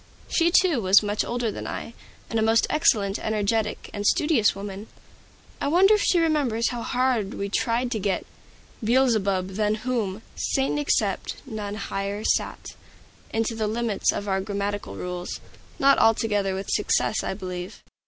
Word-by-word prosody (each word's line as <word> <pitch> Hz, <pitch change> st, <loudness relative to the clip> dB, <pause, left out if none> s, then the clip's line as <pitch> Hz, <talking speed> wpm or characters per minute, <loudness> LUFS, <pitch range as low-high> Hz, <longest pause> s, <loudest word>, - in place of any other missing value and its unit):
She, 335 Hz, 0 st, +2 dB
too, 345 Hz, -7 st, +3 dB
was 195 Hz, +2 st, +5 dB
much 205 Hz, 0 st, 0 dB
older 240 Hz, -2 st, -2 dB
than -, -, -6 dB
I, 230 Hz, -, -6 dB, 0.3 s
and 225 Hz, -, -1 dB
a -, -, +1 dB
most 225 Hz, +1 st, +3 dB
excellent, 210 Hz, -11 st, +2 dB
energetic, 215 Hz, 0 st, -1 dB
and 205 Hz, -, -4 dB
studious 255 Hz, -2 st, +3 dB
young 195 Hz, +1 st, -6 dB
woman. 200 Hz, +2 st, -7 dB, 0.7 s
I -, -, 0 dB
wonder 370 Hz, +7 st, +5 dB
if 420 Hz, -, +3 dB
she 365 Hz, -, +3 dB
remembers 290 Hz, -9 st, +1 dB
how 240 Hz, -1 st, -4 dB
hard 245 Hz, -5 st, 0 dB
we 200 Hz, 0 st, -3 dB
tried 235 Hz, +4 st, 0 dB
to 220 Hz, -, -1 dB
get 195 Hz, -2 st, -1 dB, 0.6 s
"Beelzebub 215 Hz, -6 st, +2 dB
than 210 Hz, +2 st, 0 dB
whom, 220 Hz, -5 st, -2 dB
Satan 270 Hz, +2 st, 0 dB
except, 290 Hz, -, 0 dB
none 210 Hz, -5 st, -5 dB
higher 200 Hz, 0 st, -4 dB
sat," -, -, -1 dB, 0.6 s
into 225 Hz, +1 st, 0 dB
the 220 Hz, -1 st, -1 dB
limits 225 Hz, -1 st, 0 dB
of 205 Hz, -, -4 dB
our 190 Hz, -1 st, 0 dB
grammatical 200 Hz, +1 st, -3 dB
rules, 180 Hz, 0 st, -5 dB, 0.4 s
not 275 Hz, 0 st, +5 dB
altogether 205 Hz, -3 st, +2 dB
with 195 Hz, +1 st, -4 dB
success, 210 Hz, +1 st, +1 dB
I -, -, -2 dB
believe. 185 Hz, -2 st, -7 dB
220 Hz, 160 wpm, -25 LUFS, 200-245 Hz, 0.7 s, was